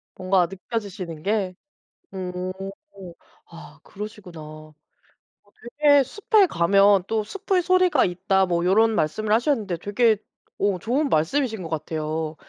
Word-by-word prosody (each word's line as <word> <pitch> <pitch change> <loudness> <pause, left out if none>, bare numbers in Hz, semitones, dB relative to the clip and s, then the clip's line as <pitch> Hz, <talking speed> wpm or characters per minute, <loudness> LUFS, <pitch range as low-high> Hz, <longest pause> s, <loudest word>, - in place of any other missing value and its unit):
뭔가 185 -1 +2
느껴지시는 190 -4 -6
게 195 -2 -1 0.6
음. 185 0 -4 0.9
아 160 -2 -14
그러시구나. 205 -5 -9
어 155 0 -12 1.1
되게 285 -2 +6
"숲에 415 - +2
가면 195 - +4
또 220 -1 0
숲의 380 - -1
소리가 365 -6 +3
있다." 190 +2 +1
뭐 175 -1 -1
요런 220 +4 +4
말씀을 210 +8 -1
하셨는데 225 - 0
되게 215 +4 +2 0.4
오 200 -3 0
좋은 270 - 0
말씀이신 220 - 0
거 165 - -7
같아요. 155 0 -3
195 Hz, 255 characters per minute, -23 LUFS, 170-225 Hz, 1.1 s, 되게